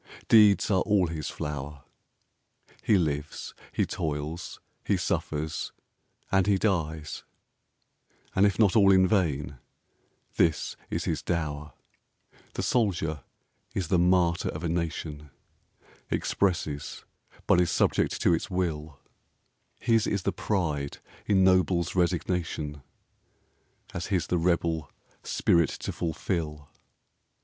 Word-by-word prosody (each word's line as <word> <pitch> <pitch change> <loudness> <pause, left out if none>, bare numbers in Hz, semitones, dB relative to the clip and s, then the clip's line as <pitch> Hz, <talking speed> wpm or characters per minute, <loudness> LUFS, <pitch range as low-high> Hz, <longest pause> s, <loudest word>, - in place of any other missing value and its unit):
Deeds 105 -1 +6
are 95 -2 +3
all 100 -3 +3
his 80 -3 -4
flower. 75 -1 -5 1.0
He 105 - +4
lives, 75 -3 -2 0.2
he - - +1
toils, 75 +3 -4 0.2
he - - +1
suffers, 80 0 -2 0.6
and 95 0 +3
he 100 -2 +4
dies, 80 -7 -1 1.1
And 100 +2 +5
if 100 - -1
not 105 -3 +4
all 100 -3 +6
in 95 -1 +5
vain 75 - 0 0.8
this 80 -2 +2
is - - -2
his - - -1
dower: 75 -4 -3 0.8
The - - -2
Soldier 85 - 0 0.6
is 90 -5 -2
the 90 - +3
Martyr 90 -1 +3
of 80 - -5
a 85 - 0
nation, 80 -3 -3 0.8
Expresses 80 -7 -1 0.4
but 90 - +5
is 90 - +1
subject - - +1
to 85 - +5
its 80 - -1
will; 80 -6 -2 0.8
His 115 -2 +2
is 100 -2 -1
the 100 - 0
Pride 80 -8 -1 0.3
ennobles 95 -3 +3
Resignation, 85 -4 -1 1.1
As 85 - -4
his 90 -6 0
the 90 - 0
rebel 80 -3 0 0.3
Spirit 85 -3 +2
to - - -5
fulfil. 80 -3 -3
85 Hz, 115 wpm, -28 LUFS, 75-95 Hz, 1.1 s, Deeds